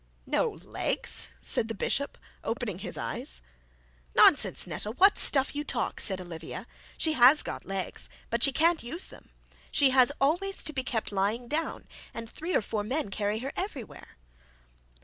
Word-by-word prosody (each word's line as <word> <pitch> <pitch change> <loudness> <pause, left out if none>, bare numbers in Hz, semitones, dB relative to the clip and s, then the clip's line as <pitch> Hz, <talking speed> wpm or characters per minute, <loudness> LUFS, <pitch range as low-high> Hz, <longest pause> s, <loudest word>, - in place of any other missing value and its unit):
'No - - +1
legs!' - - -1 0.2
said 220 - +4
the 225 - -4
bishop, 280 +7 -1 0.3
opening 225 -5 -3
his - - -5
eyes. - - -3 0.8
'Nonsense, - - +5
Netta, 210 - -4
what 375 - +5
stuff 270 0 +2
you 295 - -2
talk,' 250 -5 -1
said 190 -2 -1
Olivia. 165 -3 -8 0.3
'She 315 - +1
has 265 +2 +6
got - - -6
legs, 195 -1 -4 0.2
but 235 0 0
she 275 - +7
can't 330 +3 +3
use 275 +10 0
them. - - -15 0.4
She 275 -2 +3
has 255 +1 +5
always 350 +8 +2
to 310 - -1
be 260 - -2
kept 225 -4 -3
lying 205 +5 -1
down, 315 +5 -3 0.3
and 230 0 -6
three 330 +9 -4
or - - +3
four 210 0 -3
men 255 -1 -2
carry 205 +1 -1
her - - -2
about 365 - -3
everywhere.' 270 - -10
250 Hz, 170 wpm, -28 LUFS, 210-300 Hz, 0.8 s, she